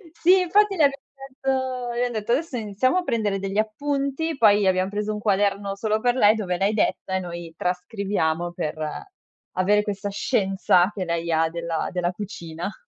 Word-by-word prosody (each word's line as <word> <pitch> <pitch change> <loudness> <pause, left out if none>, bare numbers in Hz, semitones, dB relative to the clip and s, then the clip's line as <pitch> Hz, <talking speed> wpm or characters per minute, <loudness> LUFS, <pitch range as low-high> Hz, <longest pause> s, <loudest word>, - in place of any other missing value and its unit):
Sì, 360 +3 +5
infatti 395 +3 +3
le 320 - +3
abbia 275 0 +1 0.2
detto 260 -2 -3
le 240 +1 0
han 245 - -3
detto: 220 0 -3
"Adesso 280 0 0
iniziamo 220 - 0
a 365 - +1
prendere 210 - 0
degli 195 +1 -4
appunti"; 280 +7 -1
poi 205 -4 +5
abbiam 185 +1 +2
preso 210 +1 -2
un 210 - -4
quaderno 200 -1 0
solo 215 +1 0
per 245 +2 +1
lei 215 -3 +5
dove 185 -5 -2
lei 195 +3 +1
detta 190 -2 0
e - - +1
noi 170 -2 -7
trascriviamo 180 -2 -1
per 155 - -3 0.8
avere 205 +3 +3
questa 205 0 -3
scienza 195 -3 +2
che 190 -3 -3
lei 170 0 -2
ha 160 0 +2
della 170 -1 -3
della 180 -1 -1
cucina. 180 -2 -6
205 Hz, 175 wpm, -24 LUFS, 185-245 Hz, 0.8 s, Sì